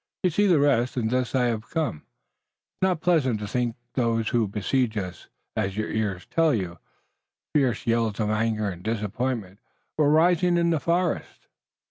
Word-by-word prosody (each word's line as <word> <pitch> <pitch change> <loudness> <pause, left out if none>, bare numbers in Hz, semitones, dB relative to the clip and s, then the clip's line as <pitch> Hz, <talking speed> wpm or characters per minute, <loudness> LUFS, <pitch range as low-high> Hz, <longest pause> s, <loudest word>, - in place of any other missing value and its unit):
You 180 - +3
saw 205 +6 +3
the 175 -5 +4
rest, 130 -3 +2
and 110 -2 0
thus 125 0 0
I 125 -1 +3
have 115 -2 -2
come. 160 - -1
It - - -16
is - - -40
not 180 -4 0
pleasant 140 -11 +2
to 115 +3 -2 0.2
those 115 -3 +1
who 115 -4 +1
besiege 110 +3 0
us, 90 -4 -5 0.3
as 95 +1 -1
your 110 - -2
ears 100 -5 -2
tell 165 -4 +2
you." 90 -5 -4 0.7
Fierce 130 -7 +1
yells 115 -2 +1
of 105 -1 +1
anger 110 -1 0
and 90 -3 -5
disappointment 110 -1 -3 0.4
were 145 -2 +4
rising 175 +3 +4
in 170 0 +2
the 160 - +1
forest. 170 +3 -1
120 Hz, 170 wpm, -25 LUFS, 105-150 Hz, 0.7 s, the